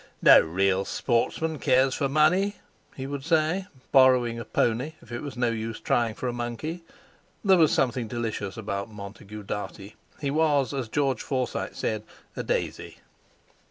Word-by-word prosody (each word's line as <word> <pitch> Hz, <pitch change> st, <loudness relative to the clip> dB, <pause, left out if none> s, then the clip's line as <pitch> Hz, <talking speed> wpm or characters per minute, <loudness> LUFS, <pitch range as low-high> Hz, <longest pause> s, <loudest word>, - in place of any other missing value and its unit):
"No -, -, +9 dB
real 95 Hz, +3 st, +1 dB
sportsman 145 Hz, +9 st, -1 dB
cares 130 Hz, +1 st, +3 dB
for 140 Hz, 0 st, -1 dB
money," 180 Hz, +8 st, +3 dB, 0.4 s
he 130 Hz, -, -5 dB
would 140 Hz, 0 st, -5 dB
say, 165 Hz, +4 st, +1 dB, 0.2 s
borrowing 125 Hz, -3 st, +5 dB
a 115 Hz, -, -6 dB
"pony" 125 Hz, +6 st, 0 dB
if 120 Hz, -, -17 dB
it 120 Hz, -, -4 dB
was 140 Hz, -4 st, -7 dB
no 120 Hz, -1 st, +1 dB
use 115 Hz, 0 st, -4 dB
trying 115 Hz, -2 st, 0 dB
for 130 Hz, -, -4 dB
a 120 Hz, -, -1 dB
"monkey." 120 Hz, +8 st, -4 dB, 0.6 s
There 190 Hz, -2 st, +6 dB
was 160 Hz, -2 st, +5 dB
something 125 Hz, -2 st, +1 dB
delicious 110 Hz, -2 st, -4 dB
about 100 Hz, -1 st, -4 dB
Montague 105 Hz, 0 st, -9 dB
Dartie. 100 Hz, 0 st, -6 dB, 0.2 s
He 140 Hz, -2 st, -1 dB
was, 145 Hz, -3 st, +2 dB
as 130 Hz, -4 st, -2 dB
George 135 Hz, 0 st, 0 dB
Forsyte 130 Hz, -3 st, -2 dB
said, 110 Hz, -1 st, -2 dB, 0.3 s
a -, -, -3 dB
"daisy." -, -, -3 dB
125 Hz, 160 wpm, -26 LUFS, 110-145 Hz, 0.6 s, No